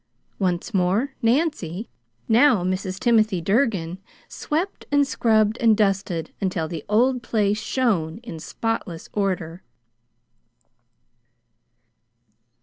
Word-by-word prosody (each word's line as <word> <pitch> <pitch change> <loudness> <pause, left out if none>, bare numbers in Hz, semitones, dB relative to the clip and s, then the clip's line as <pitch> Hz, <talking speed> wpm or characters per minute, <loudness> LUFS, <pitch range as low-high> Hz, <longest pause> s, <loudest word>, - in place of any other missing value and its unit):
Once 185 +3 -1
more 195 +9 +1
Nancy 230 - 0 0.4
now 230 -3 +4
Mrs. 185 +1 -2
Timothy 220 -5 +3
Durgin 190 -3 0 0.3
swept 335 +6 -3
and 285 0 +4
scrubbed 220 -4 +2
and 225 -3 +4
dusted 195 -5 0
until 180 -4 -1
the 160 -3 -6
old 245 +4 +3
place 210 -2 0
shone 205 -10 0
in 195 -9 -7
spotless 185 -2 -4
order. 185 -4 -2
210 Hz, 95 wpm, -23 LUFS, 180-235 Hz, 0.4 s, now